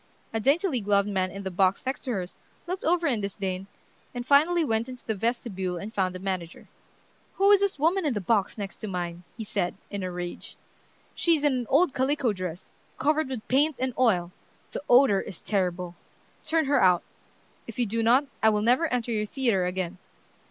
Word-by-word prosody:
A 225 - 0
daintily 280 - +2
gloved 200 0 +2
man 190 -2 0
in 200 +1 -8
the 190 - -4
box 185 +4 +2
next 265 +1 -2
to 255 - -2
hers 185 -3 -4 0.3
looked 365 +2 -4
over 340 +1 +2
in 245 -8 +1
disdain, 195 -1 -4 0.5
and 245 0 -4
finally 315 +5 +4
went 225 -1 0
into 250 -1 -10
the 220 - -1
vestibule 195 -4 -2
and 205 +5 -7
found 185 -3 0
the - - -5
manager. 185 -3 -5 0.7
"Who 395 +1 +4
is 405 - +7
this 400 -4 0
woman 340 +6 +2
in 290 -6 0
the - - 0
box 200 +2 0
next 200 -2 -6
to 215 - -6
mine?" 175 -2 -4
he 225 - -4
said, 195 -4 -2 0.2
in 200 -1 -3
a 185 - -3
rage. 175 0 -7 0.6
"She's 330 -4 +2
in 290 -2 +3
an 245 -3 -2
old 290 +2 +4
calico 265 -3 +1
dress, 185 -2 -6 0.3
covered 300 +1 +1
with 250 -5 -6
paint 290 +4 +3
and 260 0 -1
oil. 185 -9 +2 0.4
The - - -4
odor 245 -5 +6
is 180 - -7
terrible. 180 -3 -1 0.5
Turn 320 0 +1
her 275 -1 +3
out. 180 -2 +4 0.6
If - - -9
you 245 - +2
do 230 +2 -1
not, 245 +5 +4 0.2
I 220 - +6
will 210 -1 +1
never 255 +9 +3
enter 245 -3 -2
your 210 -1 -1
theatre 225 -8 +1
again." 180 0 -3
220 Hz, 200 wpm, -27 LUFS, 190-275 Hz, 0.7 s, is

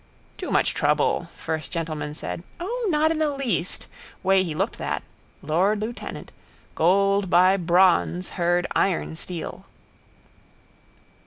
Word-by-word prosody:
Too - - -6
much - - +2
trouble, - - +1
first 160 -2 -4
gentleman 155 -3 -3
said. 170 - -5 0.2
O, 455 +6 -2
not 310 -1 +3
in 320 - -1
the 310 -1 +2
least. 255 -11 -2 0.4
Way 190 0 +4
he 170 -5 -3
looked - - -2
that. - - -2 0.4
Lord 185 +8 +2
lieutenant. 225 +3 -6 0.4
Gold 195 +3 +3
by 185 +2 +5
bronze 180 0 +3
heard 175 0 +1
iron 180 -4 +1
steel. 170 0 -6
185 Hz, 125 wpm, -24 LUFS, 170-210 Hz, 0.4 s, by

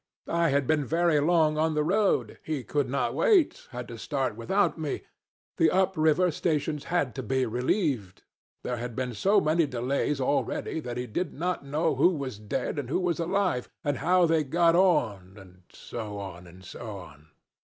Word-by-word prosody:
I 170 0 +3
had 140 0 +1
been 150 +1 +2
very 165 +2 +2
long 155 0 +3
on 160 0 +1
the 150 - +2
road. 195 +5 +1
He 150 -5 -3
could 145 +2 -1
not 140 - 0
wait. 420 -11 +2
Had 125 -1 -7
to 115 -1 -8
start 135 -3 -2
without 190 - +1
me. 150 -3 -3 0.5
The 165 - +4
up 190 +2 +2
river 160 +3 +3
stations 150 -2 -1
had 145 -9 0
to 130 - -4
be 130 +2 0
relieved. 125 - -1 0.4
There 125 - -2
had 120 0 -5
been 125 -1 -2
so 195 - +3
many 160 -1 +2
delays 135 +3 -1
already 145 +4 -1
that 125 -5 -5
he 125 - -2
did 160 +9 -3
not 175 +1 -2
know 155 +4 0
who - - +5
was 130 -7 -5
dead 125 +7 -3
and 130 -4 -5
who 155 - +1
was 180 -2 -1
alive, 180 -6 0
and 145 -2 0
how 180 +4 +3
they 160 -1 +2
got 165 +4 +3
on 110 - +1
and 90 -2 -15
so 105 -3 -7
on, 90 -3 -8
and 90 +2 -15
so 110 -1 -7
on. 75 -4 -13
145 Hz, 185 wpm, -27 LUFS, 120-170 Hz, 0.5 s, who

